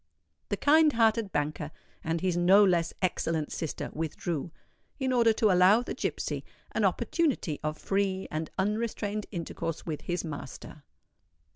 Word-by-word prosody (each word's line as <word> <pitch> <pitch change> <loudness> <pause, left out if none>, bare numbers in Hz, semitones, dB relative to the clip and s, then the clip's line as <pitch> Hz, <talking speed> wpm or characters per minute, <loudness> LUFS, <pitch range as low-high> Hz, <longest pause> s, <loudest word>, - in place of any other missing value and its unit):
The 205 - -1
kind 305 +3 +5
hearted 225 -2 +2
banker 150 0 -2 0.3
and 165 0 -1
his 185 -2 +1
no 185 +4 +6
less 175 -4 +2
excellent 165 -4 0
sister 160 - -4
withdrew, 160 +1 -3 0.5
in 260 -1 0
order 235 -2 +5
to 215 -2 +3
allow 185 +6 +5
the - - -4
gipsy - - -3 0.3
an - - 0
opportunity 275 - 0
of 155 0 -2
free 195 -1 -1
and 155 +1 -3
unrestrained 210 +1 -1
intercourse 165 -2 -4
with 155 -3 -4
his 175 -1 -3
master. 150 0 -8
185 Hz, 140 wpm, -29 LUFS, 160-215 Hz, 0.5 s, no